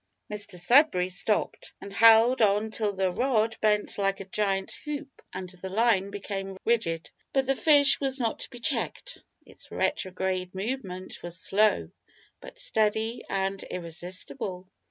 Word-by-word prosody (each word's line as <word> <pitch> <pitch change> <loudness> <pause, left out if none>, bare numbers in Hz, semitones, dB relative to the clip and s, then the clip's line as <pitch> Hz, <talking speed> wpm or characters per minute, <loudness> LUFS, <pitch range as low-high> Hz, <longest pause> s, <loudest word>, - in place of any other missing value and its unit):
Mr 205 -3 -3
Sudberry 185 - +4
stopped, 210 +4 -1
and 200 - -10
held 230 +3 +6
on 210 +1 +2
till 215 -1 0
the 190 -1 0
rod 225 0 +1
bent 210 -1 +1
like 195 0 0
a 195 - -7
giant 195 -1 -2
hoop 290 -2 -7
and 185 -1 -6
the 185 0 -8
line 205 -1 +2
became 195 -1 -5
rigid; 195 -8 0 0.2
but 270 -1 +2
the 270 +1 +1
fish 285 -1 +6
was 270 -1 -1
not 230 -3 -1
to - - -3
be 245 - -11
checked. - - -2 0.3
Its - - -14
retrograde 185 -5 -2
movement 190 -3 -5
was 175 0 -4
slow, 195 - +2 0.5
but - - -12
steady 220 +2 0
and 195 0 -1
irresistible. 180 +2 -5
205 Hz, 145 wpm, -27 LUFS, 185-230 Hz, 0.5 s, held